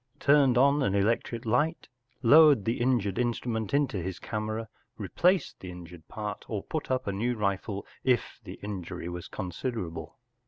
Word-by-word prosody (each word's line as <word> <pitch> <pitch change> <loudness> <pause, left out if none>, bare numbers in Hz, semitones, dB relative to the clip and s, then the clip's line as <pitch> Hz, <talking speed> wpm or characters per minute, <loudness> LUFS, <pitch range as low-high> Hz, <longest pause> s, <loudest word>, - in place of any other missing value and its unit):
turned 140 -4 +4
on 140 +3 +4
an 100 -7 +1
electric 115 +3 0
light, 150 +9 +1 0.4
lowered 145 -3 +7
the 115 +1 -1
injured 120 -5 +1
instrument 120 -2 -1
into 140 -6 +1
his 90 0 -4
camera, 110 +1 -4 0.3
replaced 170 - +1
the 95 - -8
injured 85 -2 -11
part, 105 -1 -5
or 105 -3 -3
put 155 -2 -4
up 130 0 0
a 100 - -1
new 120 +5 -1
rifle 100 -1 -2 0.2
if 125 -3 +1
the - - -8
injury 90 -4 -5
was 90 0 -6
con¬ 90 -4 -5
siderable. 85 -9 -4
110 Hz, 160 wpm, -28 LUFS, 95-130 Hz, 0.4 s, lowered